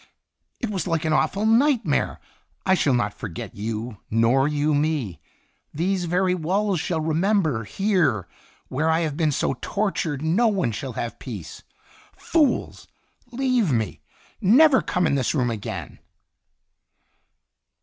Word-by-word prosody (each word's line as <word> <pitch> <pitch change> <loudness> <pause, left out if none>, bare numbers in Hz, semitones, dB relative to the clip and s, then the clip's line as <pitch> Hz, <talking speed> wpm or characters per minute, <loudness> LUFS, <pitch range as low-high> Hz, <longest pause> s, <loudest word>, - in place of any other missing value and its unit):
It 235 -4 -3
was 185 -4 -2
like 165 -2 0
an 155 - +1
awful 200 +6 +1
night 240 +1 +3
mare. 145 - 0 0.5
I 190 - +4
shall 145 -7 +2
not 105 -4 0
forget 100 -8 -7
you, 110 +2 -4
nor 115 +5 +3
you 150 0 +1
me. 145 - -1 0.6
These 180 +3 0
very 180 +2 +1
walls 185 +3 0
shall 165 +1 -1
remember 160 - +1
here, 165 - +1 0.4
where 150 +5 0
I 160 +1 +2
have 155 -4 -2
been 155 -1 +1
so 135 -1 -1
tortured 175 -8 -2
no 185 +10 +3
one 190 - +1
shall 125 +4 -5
have 115 +1 -5
peace! 100 - -8 0.6
Fools! 310 -5 0 0.4
Leave 245 - +1
me! 110 -5 -1 0.4
Never 260 +8 +6
come 180 - 0
in - - +1
this 135 +1 0
room 125 -4 +1
again 110 -3 -6
160 Hz, 140 wpm, -24 LUFS, 125-195 Hz, 0.6 s, Never